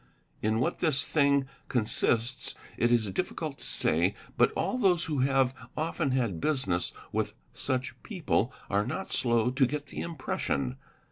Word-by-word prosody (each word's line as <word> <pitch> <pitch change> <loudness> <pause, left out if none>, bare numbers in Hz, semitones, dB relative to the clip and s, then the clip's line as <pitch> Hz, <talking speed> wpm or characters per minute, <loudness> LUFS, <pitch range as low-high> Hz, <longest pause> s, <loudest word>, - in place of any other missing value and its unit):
In 110 +1 +1
what 130 - 0
this 150 -5 +3
thing 140 -2 +3 0.2
consists 120 0 +1 0.2
it 120 - +2
is 110 -4 +2
difficult 155 - -3
to - - -7
say, - - +2 0.2
but - - +4
all 255 - -1
those 180 -6 +3
who 150 -4 -1
have 135 -1 +3 0.2
often 155 -2 0
had 120 -10 0
business 130 -13 +1 0.2
with - - -1 0.2
such 130 +2 -1
people 165 - 0 0.2
are 100 +1 +2
not 190 - -4
slow 120 -1 +2
to 130 0 +3
get 145 +2 -3
the - - -5
impression. 70 - -2
130 Hz, 150 wpm, -29 LUFS, 115-150 Hz, 0.2 s, but